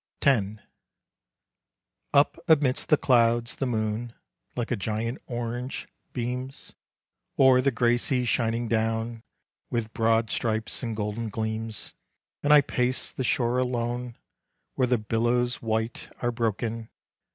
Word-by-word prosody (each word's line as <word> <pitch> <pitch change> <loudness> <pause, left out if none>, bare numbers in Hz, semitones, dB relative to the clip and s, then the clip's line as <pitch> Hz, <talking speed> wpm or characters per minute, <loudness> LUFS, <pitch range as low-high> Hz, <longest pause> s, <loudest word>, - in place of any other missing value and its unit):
X. 110 -7 +2 1.5
Up 140 +1 +3
amidst 145 -5 +3
the 155 - +6
clouds, 120 -2 +3
the 135 - -1
moon, 110 0 -2 0.4
Like 120 -2 -3
a - - +2
giant 110 +4 -3
orange, 120 +1 -4 0.2
beams, 125 +2 -5 0.6
O'er 130 -1 +6
the 140 - +3
gray 120 -1 +2
sea 125 0 0
shining 115 0 0
down, 115 +1 -1 0.5
With 110 -2 -2
broad 115 0 +2
stripes 110 -1 -1
and 115 -3 -3
golden 105 +2 -3
gleams. 110 0 -4 0.5
And 145 - +2
I 150 -1 +9
pace 125 -1 +2
the 130 - -4
shore 120 0 +1
alone, 120 -1 -2 0.6
Where 130 - +1
the 125 0 +3
billows 120 +3 0
white 110 +1 -2
are 120 - 0
broken. 115 0 -2
120 Hz, 125 wpm, -26 LUFS, 110-125 Hz, 1.5 s, I